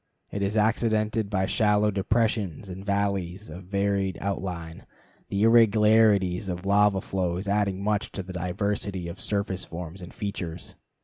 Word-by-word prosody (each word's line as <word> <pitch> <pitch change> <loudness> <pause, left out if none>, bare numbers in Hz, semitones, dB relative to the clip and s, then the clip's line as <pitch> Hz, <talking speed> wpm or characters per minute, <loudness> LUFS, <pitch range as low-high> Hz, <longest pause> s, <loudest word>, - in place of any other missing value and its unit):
It 100 - -3
is 100 +2 0
accidented 110 -1 +1
by 95 -2 +1
shallow 105 -1 +2
depressions 100 -3 0
and 95 +1 -7
valleys 100 -2 -1
of 90 +3 -9
varied 100 -1 0
outline, 90 -4 -4 0.4
the 100 +1 0
irregularities 105 -4 +4
of 90 +1 -4
lava 100 -1 +3
flows 95 0 -2
adding 100 -1 0
much 105 0 0
to 95 - -4
the 95 0 -8
diversity 95 +1 -2
of 90 +3 -7
surface 100 -2 -1
forms 85 +2 -7
and 90 - -9
features. 95 -5 -5
100 Hz, 140 wpm, -26 LUFS, 90-105 Hz, 0.4 s, irregularities